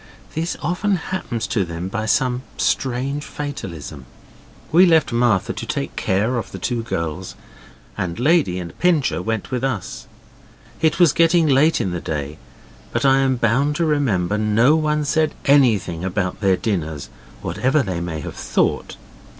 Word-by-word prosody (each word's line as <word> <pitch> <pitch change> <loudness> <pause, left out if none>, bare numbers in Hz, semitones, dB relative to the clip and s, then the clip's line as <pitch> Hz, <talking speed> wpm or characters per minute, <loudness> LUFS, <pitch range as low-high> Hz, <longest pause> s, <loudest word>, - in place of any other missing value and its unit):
This 165 +2 -2
often 180 +5 0
happens 165 -9 -3
to 105 - 0
them 85 +1 -5
by 110 +3 -3
some 125 +2 +1 0.2
strange 135 +3 -1
fatalism. 85 - -7 0.6
We 180 +4 +6
left 160 -4 +3
Martha 120 -5 +2
to - - -6
take - - -3
care 110 +7 0
of - - -7
the - - -6
two 120 -2 -2
girls, 90 -4 -4 0.6
and 85 -1 -3
Lady 145 - +3
and 85 -2 -7
Pincher 150 - +2
went 110 +3 -3
with 125 0 -2
us. 130 -8 -3 0.7
It 160 +1 +2
was 170 -5 +6
getting 165 0 +4
late 150 +3 +4
in 95 - -1
the 85 -1 -4
day, 75 0 -4 0.5
but - - -1
I 135 0 +5
am 135 -1 +2
bound 125 +5 +1
to 170 - +1
remember 105 - +1
no 110 +7 +4
one 150 -1 0
said 155 +1 +1
anything 110 - +3
about 95 0 -2
their 95 -2 +3
dinners, 80 -7 -3 0.3
whatever 135 +3 +1
they 90 -5 -3
may 80 -3 -4
have - - -6
thought. - - -1
120 Hz, 160 wpm, -21 LUFS, 90-150 Hz, 0.7 s, We